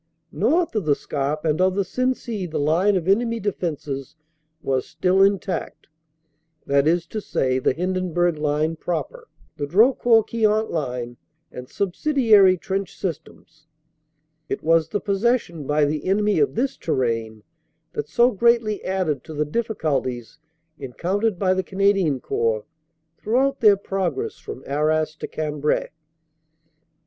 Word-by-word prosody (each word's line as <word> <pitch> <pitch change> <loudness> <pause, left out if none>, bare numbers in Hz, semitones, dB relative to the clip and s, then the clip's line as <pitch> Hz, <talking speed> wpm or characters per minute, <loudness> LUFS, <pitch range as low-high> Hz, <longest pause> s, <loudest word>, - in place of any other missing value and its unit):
North 335 -3 +1
of 215 -6 -1
the 145 -2 +3
Scarpe 145 +3 -3
and 155 +2 +1
of 185 0 +2
the 200 -1 0
Sensee 235 -3 -2
the 160 - -4
line 170 +8 +2
of 180 -2 -1
enemy 230 +4 +2
defenses 155 - -4 0.5
was 130 -2 0
still 185 +1 +1
intact, 195 -1 0 0.8
that 140 +1 +2
is 170 +1 +2
to 215 +5 -5
say 130 -8 0
the 130 - +1
Hindenburg 175 -1 -1
line 150 +2 0
proper, 325 - -4 0.3
the 145 - -3
Drocourt 225 - +4
Queant 220 -1 +1
line, 125 -6 -3 0.3
and 125 0 -9
subsidiary 205 - +3
trench 195 +2 -4
systems. 155 -2 -7 0.8
It - - -3
was 165 0 +3
the 205 - -1
possession 200 - -1
by 150 0 +3
the 150 +1 -2
enemy 205 -1 +2
of 140 -1 +1
this 265 +2 -1
terrain 115 -7 -2 0.5
that 440 - -4
so 240 +1 +4
greatly 230 -1 +2
added 180 -8 -1
to 155 - -8
the 150 +1 0
difficulties 150 - -2 0.4
encountered 185 - -1
by 185 0 +2
the 190 - 0
Cana 195 +2 +2
dian 160 -9 0
Corps 110 -2 -1 0.5
throughout 270 +5 +1
their 210 -3 +6
progress 190 -7 -3
from 130 - -9
Arras 155 +2 0
to - - -5
Cambrai. 150 -1 -1
175 Hz, 135 wpm, -22 LUFS, 150-205 Hz, 0.8 s, their